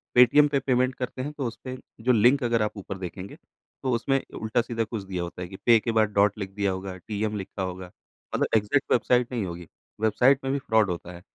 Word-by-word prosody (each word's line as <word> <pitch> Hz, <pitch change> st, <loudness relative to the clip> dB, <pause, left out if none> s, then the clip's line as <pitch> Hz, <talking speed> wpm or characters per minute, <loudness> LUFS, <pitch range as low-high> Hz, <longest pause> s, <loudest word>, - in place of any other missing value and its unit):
Paytm 125 Hz, +4 st, +7 dB
पे 140 Hz, -1 st, +1 dB
payment 130 Hz, -1 st, +1 dB
करते 130 Hz, 0 st, -4 dB
हैं 145 Hz, +3 st, -4 dB
तो 140 Hz, -3 st, -4 dB
उसपे 130 Hz, +2 st, -7 dB, 0.3 s
जो 125 Hz, -, +4 dB
लिंक 125 Hz, +4 st, +4 dB
अगर 115 Hz, -2 st, +2 dB
आप 105 Hz, 0 st, -2 dB
ऊपर 100 Hz, 0 st, -6 dB
देखेंगे 95 Hz, +1 st, -7 dB, 0.5 s
तो 130 Hz, -, 0 dB
उसमें 135 Hz, +3 st, +1 dB, 0.2 s
उल्टा-सीधा 115 Hz, +1 st, 0 dB
कुछ 110 Hz, -1 st, -5 dB
दिया 95 Hz, -2 st, -4 dB
होता 85 Hz, +1 st, -7 dB
है 90 Hz, -, -4 dB
कि 95 Hz, -, -10 dB
पे 115 Hz, -2 st, +7 dB
के 115 Hz, -, -2 dB
बाद 110 Hz, -1 st, +3 dB
डॉट 100 Hz, +1 st, +3 dB
लिख 100 Hz, -2 st, -4 dB
दिया 100 Hz, -1 st, 0 dB
होगा, 95 Hz, 0 st, -5 dB
टीएम 105 Hz, +2 st, -3 dB
लिखा 95 Hz, 0 st, -6 dB
होगा। 90 Hz, -1 st, -5 dB, 0.4 s
मतलब -, -, +1 dB
एग्जैक्ट 110 Hz, +7 st, 0 dB
वेबसाइट 125 Hz, +1 st, +3 dB
नहीं 115 Hz, -5 st, -1 dB
होगी। 85 Hz, -1 st, -7 dB, 0.3 s
वेबसाइट 125 Hz, +5 st, +3 dB
में 135 Hz, -, -1 dB
भी 140 Hz, -, 0 dB
फ्रॉड 110 Hz, -5 st, +2 dB
होता 90 Hz, 0 st, -5 dB
है 85 Hz, -, -11 dB
110 Hz, 220 wpm, -26 LUFS, 95-125 Hz, 0.5 s, Paytm